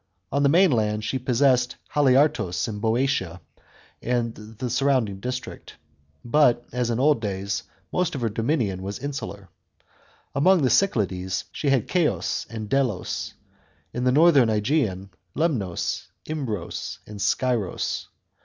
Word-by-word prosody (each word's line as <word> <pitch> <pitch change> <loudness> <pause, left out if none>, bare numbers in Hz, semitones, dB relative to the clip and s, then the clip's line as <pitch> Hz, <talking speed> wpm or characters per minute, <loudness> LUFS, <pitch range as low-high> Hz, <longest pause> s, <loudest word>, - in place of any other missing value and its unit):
On 140 +2 +1
the 140 - +4
mainland, 115 - +3
she 130 +5 -2
possessed 125 0 +2 0.2
Haliartos 130 - +3
in 105 -2 -5
6o3otia 115 -6 0 0.6
and 120 -1 0
the 110 +3 -7
surrounding 125 -6 +1
district; 125 +4 -6 0.5
but, 120 -2 +3
as 125 -1 -1
in 115 0 0
old 145 -3 +3
days, 100 -1 -2 0.3
most 180 -3 0
of 135 - -4
her 115 - +1
dominion 110 - -1
was 100 +1 -4
insular. 130 -8 -6 0.9
Among 170 +4 +4
the 130 - +3
Cyclades, 95 - +1
she 145 - -2
had 135 -5 +2
Ceos 175 -4 0
and 110 -2 -6
Delos; 125 -5 -1 0.6
in 125 - -2
tbe 125 0 +3
northern 150 -7 +6
^Egean, 105 -4 0 0.3
Lemnos, 120 - -1 0.2
Imbros 125 - -4
and 105 -1 -9
Scyros. 115 -2 -1
120 Hz, 125 wpm, -24 LUFS, 105-140 Hz, 0.9 s, northern